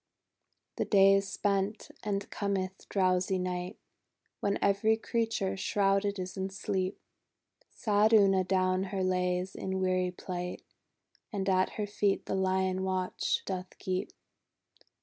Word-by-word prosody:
• - - -57
•••••••• - - -57 0.7
The - - 0
day 195 -1 +6
is 195 0 +2
spent, 200 +1 -1
and 200 -1 -2
cometh 190 -2 -3
drowsy 185 -1 +2
Night, 180 +1 -3 0.6
When 200 0 0
every 200 +3 +3
creature 225 -4 -1
shrouded 200 +1 +1
is 185 -1 -5
in 190 0 -2
sleep. 190 0 -2 0.7
Sad 210 0 +2
Una 195 -3 +5
down 185 0 +1
her 190 -1 -2
lays 180 0 0
in 190 0 -3
weary 185 -1 +1
plight, 180 0 -5 0.7
And 200 -3 -2
at 185 -1 +2
her 210 - 0
feet 205 -1 0
the - - -3
Lion 190 0 +1
watch 185 -1 -1
doth 185 -1 -5
keep. 185 0 -2
190 Hz, 135 wpm, -30 LUFS, 185-200 Hz, 0.7 s, day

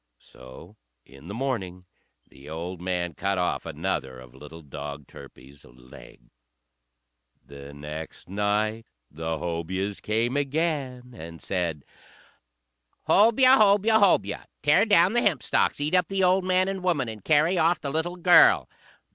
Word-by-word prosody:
So 65 - -15 0.3
in 70 +4 -16
the 100 - -7
morning 100 -9 -4 0.4
the 70 +2 -15
old 85 +3 -6
man 90 -2 -3
cut 95 +4 -2
off 90 -1 -2
another 65 -1 -4
of 65 -1 -15
little 75 +5 -13
dog 70 0 -8
Turpie's 70 +3 -15
legs. 60 -1 -17 1.1
The 70 0 -12
next 75 +2 -9
night 105 +3 -1 0.2
the 80 +1 -4
Hobyahs 90 +4 -4
came 115 +4 -1
again, 140 -4 -2
and 85 -3 -10
said, 85 -6 -3 1.2
"Hobyah! 245 +5 +5
Hobyah! 210 +1 +4
Hobyah! 200 -3 +1 0.2
Tear 150 +8 +4
down 185 -1 +4
the 240 - +2
hempstalks, 165 - 0
eat 150 +3 -2
up 180 -2 +3
the 195 -1 -1
old 185 +1 +3
man 185 0 +2
and 195 -1 -4
woman, 160 -9 0
and 110 -3 -9
carry 160 +4 +2
off 165 +2 +2
the 140 - -5
little 160 +4 -2
girl!" 175 0 +5
105 Hz, 140 wpm, -25 LUFS, -, 1.2 s, Hobyah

